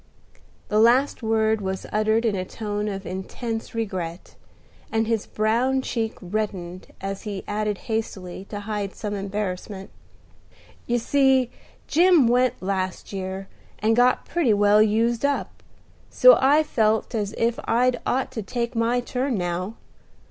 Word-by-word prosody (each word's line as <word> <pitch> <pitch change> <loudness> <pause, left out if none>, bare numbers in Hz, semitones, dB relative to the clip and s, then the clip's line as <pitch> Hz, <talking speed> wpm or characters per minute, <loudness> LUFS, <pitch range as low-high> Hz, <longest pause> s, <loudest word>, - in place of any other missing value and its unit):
The 210 - +2
last 250 +6 +4
word 220 -1 +1
was 190 -1 -3
uttered 220 +2 +2
in 215 -3 +1
a 185 - -2
tone 210 +1 -4
of 195 -1 -4
intense 225 +5 -5
regret, 185 -6 -4 0.6
and 225 0 +1
his 225 -2 -1
brown 240 +5 +1
cheek 225 -3 -2
reddened 185 -2 -4
as 195 0 -4
he 200 -3 -5
added 210 0 -1
hastily, 195 -5 -4
to 205 0 -6
hide 205 -2 -4
some 210 -2 -4
embarrassment. 195 0 -4 1.0
"You 240 - +2
see, 265 0 +3 0.3
Jim 340 -5 +5
went 250 -3 +2
last 185 0 -3
year, 190 0 -4 0.3
and 220 +1 +2
got 245 +1 +3
pretty 280 -11 +2
well 205 +1 +5
used 225 +3 +2
up; 280 0 -1 0.5
so - - +7
I 290 +4 +5
felt 220 -6 +1
as 205 -3 -2
if 230 0 +1
I'd 245 +2 +2
ought 260 +1 -1
to 240 -4 -4
take 235 +3 -3
my 230 +2 +1
turn 250 0 -2
now. 180 +4 -3
220 Hz, 140 wpm, -24 LUFS, 195-240 Hz, 1.0 s, so